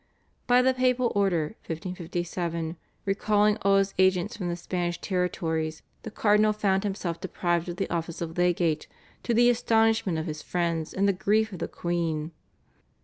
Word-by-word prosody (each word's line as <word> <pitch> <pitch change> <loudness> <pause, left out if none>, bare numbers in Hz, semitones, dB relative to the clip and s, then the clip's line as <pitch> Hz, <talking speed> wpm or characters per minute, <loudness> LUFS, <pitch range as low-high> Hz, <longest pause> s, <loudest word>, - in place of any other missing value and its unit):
By 245 +1 +5
the 260 0 +4
papal 255 -1 +2
order 175 -6 +1
(1557) 170 -1 -3 0.3
recalling 210 +1 +2
all 195 0 +4
his 195 0 +1
agents 190 +3 +3
from 185 -5 -3
the 170 - -1
Spanish 175 0 -3
territories 160 -4 -2 0.2
the - - -7
Cardinal 215 0 +3
found 195 -2 +1
himself 190 -4 -3
deprived 175 -2 -1
of 175 - -4
the 195 +1 -2
office 170 -1 -3
of 165 -1 -5
legate, 175 -3 +1 0.3
to 235 - 0
the 240 +1 +6
astonishment 225 -6 +2
of 160 - -2
his 155 -2 -5
friends 170 -3 -1
and 195 +1 +1
the 200 - +3
grief 215 +3 +1
of 180 - -7
the - - -2
queen. 165 -2 -2
180 Hz, 160 wpm, -27 LUFS, 170-210 Hz, 0.3 s, the